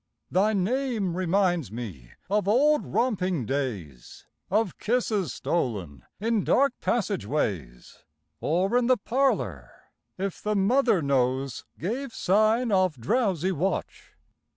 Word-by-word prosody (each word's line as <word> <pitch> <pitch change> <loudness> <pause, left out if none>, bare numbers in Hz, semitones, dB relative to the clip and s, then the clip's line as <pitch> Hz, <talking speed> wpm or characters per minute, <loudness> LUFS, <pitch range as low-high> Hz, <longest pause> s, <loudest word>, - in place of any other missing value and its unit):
Thy 205 +4 +3
name 215 -2 0
reminds 180 - +1
me 95 - -8
of 205 0 0
old 290 +8 +4
romping 185 - 0
days, 105 - -5 0.2
Of 210 -2 0
kisses 215 -5 0
stolen 100 - -3
in 220 -1 0
dark 275 -1 +3
passage 205 - -1
ways, 85 - -3 0.4
Or 185 +8 0
in 245 -1 +3
the 255 -1 +4
parlor, 205 - 0 0.5
if 195 -1 -4
the 210 0 -1
mother 215 - +3
nose 130 -2 0
Gave 235 - -4
sign 215 +5 +2
of 185 -8 +2
drowsy 190 - +1
watch. 190 +3 -3
190 Hz, 115 wpm, -26 LUFS, 135-225 Hz, 0.5 s, old